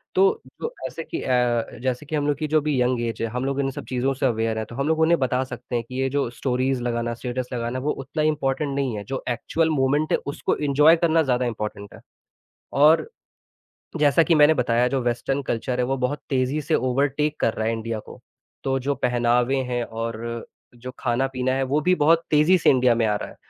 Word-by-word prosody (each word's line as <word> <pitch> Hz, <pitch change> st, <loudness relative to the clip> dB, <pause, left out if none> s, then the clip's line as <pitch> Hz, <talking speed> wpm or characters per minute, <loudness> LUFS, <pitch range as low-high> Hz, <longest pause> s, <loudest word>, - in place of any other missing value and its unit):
तो 405 Hz, +4 st, +3 dB, 0.2 s
जो 470 Hz, +1 st, -3 dB
ऐसे 165 Hz, -, -7 dB
कि -, -, -5 dB
अ, 125 Hz, -2 st, 0 dB
जैसे 130 Hz, +2 st, -2 dB
कि 155 Hz, -, -4 dB
हम 145 Hz, 0 st, 0 dB
लोग 145 Hz, -2 st, +1 dB
की 155 Hz, -, -2 dB
जो 155 Hz, +1 st, +3 dB
अभी 145 Hz, -3 st, 0 dB
यंग 125 Hz, -1 st, +1 dB
ऐज़ 115 Hz, -2 st, -3 dB
है, 115 Hz, -, -1 dB
हम 125 Hz, +3 st, -3 dB
लोग 140 Hz, 0 st, -1 dB
इन 135 Hz, -, +1 dB
सब -, -, -8 dB
चीज़ों 130 Hz, +1 st, 0 dB
से 135 Hz, +1 st, -2 dB
अवेयर 115 Hz, -2 st, 0 dB
हैं। 110 Hz, -, -2 dB
तो 120 Hz, -, -9 dB
हम 140 Hz, +3 st, -1 dB
लोग 160 Hz, 0 st, +1 dB
उन्हें 165 Hz, +1 st, +4 dB
बता 130 Hz, 0 st, +1 dB
सकते 125 Hz, -1 st, -7 dB
हैं 120 Hz, -, 0 dB
कि 130 Hz, +1 st, -3 dB
ये 135 Hz, -, +1 dB
जो 140 Hz, -2 st, -1 dB
स्टोरीज़ 130 Hz, +1 st, -1 dB
लगाना, 120 Hz, -1 st, -1 dB
स्टेटस 125 Hz, +1 st, -4 dB
लगाना, 120 Hz, +1 st, -2 dB
वो 145 Hz, +3 st, -1 dB
उतना 155 Hz, +3 st, -3 dB
इम्पोर्टेंट 145 Hz, -2 st, 0 dB
नहीं 135 Hz, -5 st, -1 dB
है, 100 Hz, -, -5 dB
जो 130 Hz, +5 st, -5 dB
एक्चुअल 160 Hz, +6 st, 0 dB
मोमेंट 145 Hz, +1 st, +1 dB
है, -, -, +4 dB
उसको 140 Hz, -, -1 dB
एन्जॉय 150 Hz, +2 st, +4 dB
करना 165 Hz, 0 st, +3 dB
ज़्यादा 125 Hz, -3 st, +1 dB
इम्पोर्टेंट 105 Hz, -3 st, -5 dB
है -, -, -13 dB, 0.8 s
और 155 Hz, -, +5 dB, 0.9 s
जैसा 150 Hz, +2 st, +4 dB
कि 165 Hz, -, +3 dB
मैंने 150 Hz, +1 st, +6 dB
बताया, 125 Hz, -3 st, +2 dB
जो 135 Hz, 0 st, -1 dB
वेस्टर्न 125 Hz, +3 st, -1 dB
कल्चर 125 Hz, +2 st, -2 dB
है, 125 Hz, -, +2 dB
वो 135 Hz, +2 st, -1 dB
बहुत 125 Hz, +3 st, -1 dB
तेज़ी 135 Hz, +2 st, 0 dB
से 155 Hz, +2 st, 0 dB
ओवरटेक 140 Hz, +4 st, 0 dB
कर 110 Hz, -, +1 dB
रहा 110 Hz, -, -2 dB
है 115 Hz, -, +1 dB
इंडिया 115 Hz, 0 st, -3 dB
को। -, -, -12 dB, 0.4 s
तो 135 Hz, 0 st, 0 dB
जो 140 Hz, +2 st, -1 dB
पहनावे 125 Hz, 0 st, +1 dB, 0.2 s
हैं 120 Hz, -1 st, 0 dB
और 115 Hz, +1 st, -5 dB, 0.3 s
जो 125 Hz, +2 st, -8 dB
खाना-पीना 130 Hz, +1 st, 0 dB
है 135 Hz, 0 st, 0 dB
वो 135 Hz, +3 st, +1 dB
भी 180 Hz, +4 st, +3 dB
बहुत 165 Hz, +1 st, +3 dB
तेज़ी 155 Hz, +5 st, +5 dB
से 170 Hz, -, +3 dB
इंडिया 125 Hz, -3 st, +4 dB
में 115 Hz, -1 st, +1 dB
आ 105 Hz, -1 st, +1 dB
रहा -, -, -5 dB
है -, -, -14 dB
130 Hz, 225 wpm, -23 LUFS, 120-145 Hz, 0.9 s, मैंने